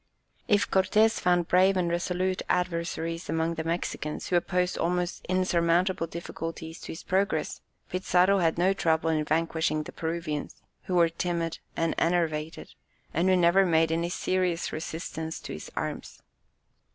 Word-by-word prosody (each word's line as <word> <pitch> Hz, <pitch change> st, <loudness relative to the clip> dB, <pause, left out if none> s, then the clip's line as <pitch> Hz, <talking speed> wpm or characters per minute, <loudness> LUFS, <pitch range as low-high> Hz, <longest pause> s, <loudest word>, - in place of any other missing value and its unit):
If 205 Hz, -1 st, +3 dB
Cortès 210 Hz, +4 st, +3 dB
found 175 Hz, -1 st, +2 dB
brave 190 Hz, +2 st, +4 dB
and 180 Hz, -2 st, +1 dB
resolute 180 Hz, +2 st, -1 dB
adversaries 170 Hz, -2 st, -1 dB
among 165 Hz, +1 st, 0 dB
the 160 Hz, -1 st, -4 dB
Mexicans, 165 Hz, -2 st, -3 dB
who 180 Hz, -, +1 dB
opposed 180 Hz, +1 st, +1 dB
almost 180 Hz, +1 st, -1 dB
insurmountable 180 Hz, -1 st, +2 dB
difficulties 165 Hz, -1 st, -6 dB
to -, -, -9 dB
his 160 Hz, -, -9 dB
progress, 195 Hz, +2 st, 0 dB, 0.3 s
Pizarro 185 Hz, +1 st, +3 dB
had 165 Hz, -2 st, +2 dB
no 185 Hz, +3 st, +3 dB
trouble 160 Hz, -3 st, +1 dB
in 155 Hz, -1 st, +1 dB
vanquishing 160 Hz, 0 st, 0 dB
the -, -, -9 dB
Peruvians, 160 Hz, -2 st, -4 dB, 0.3 s
who 185 Hz, -, -2 dB
were 170 Hz, -1 st, +5 dB
timid 170 Hz, -1 st, -2 dB, 0.2 s
and 165 Hz, 0 st, +1 dB
enervated, 165 Hz, -2 st, -1 dB, 0.4 s
and 175 Hz, +4 st, +2 dB
who 185 Hz, -, +5 dB
never 175 Hz, +2 st, +5 dB
made 165 Hz, -3 st, +3 dB
any 170 Hz, +1 st, 0 dB
serious 180 Hz, -1 st, -1 dB
resistance 160 Hz, 0 st, -5 dB
to -, -, -7 dB
his 75 Hz, -, -8 dB
arms. -, -, -5 dB
170 Hz, 145 wpm, -28 LUFS, 165-180 Hz, 0.4 s, were